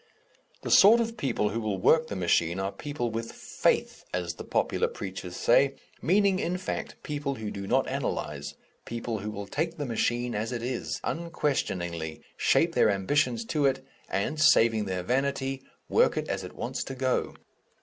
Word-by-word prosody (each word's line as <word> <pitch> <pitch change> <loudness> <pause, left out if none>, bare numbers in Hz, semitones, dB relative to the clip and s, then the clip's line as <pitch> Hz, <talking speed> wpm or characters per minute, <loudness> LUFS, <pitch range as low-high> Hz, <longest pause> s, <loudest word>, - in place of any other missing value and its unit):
The - - -3
sort 215 +4 +8
of 230 0 -1
people 115 - 0
who 115 - -2
will 105 -3 -1
work 160 - +4
the - - -5
machine 85 -1 +1
are 95 0 -1
people 145 -4 -4
with 115 +1 -4
"faith," - - 0
as 90 -1 -2
the - - -8
popular - - +1
preachers 95 -2 -6
say, 135 +3 +4 0.3
meaning, 195 +2 +3
in 180 0 -1
fact, 185 - -4
people 145 -2 -3
who 110 -4 -5
do 100 0 -6
not - - +2
analyze, 75 0 -3 0.3
people 115 -1 -3
who 105 +2 -4
will 100 -1 -5
take 165 +9 -2
the 145 - -3
machine 120 0 0
as 110 +3 -2
it 120 -2 -3
is, 125 0 -3
unquestioningly, 90 - -2
shape - - +3
their - - +4
ambitions 115 +4 +1
to 145 +2 +2
it, 135 0 -1 0.2
and 105 +11 -1
saving 110 -6 +5
their 90 -2 -2
vanity 135 +3 -1 0.3
work - - +3
it - - -1
as - - -2
it - - -9
wants - - -3
to 135 - -6
go. 130 0 0
120 Hz, 175 wpm, -28 LUFS, 100-145 Hz, 0.3 s, sort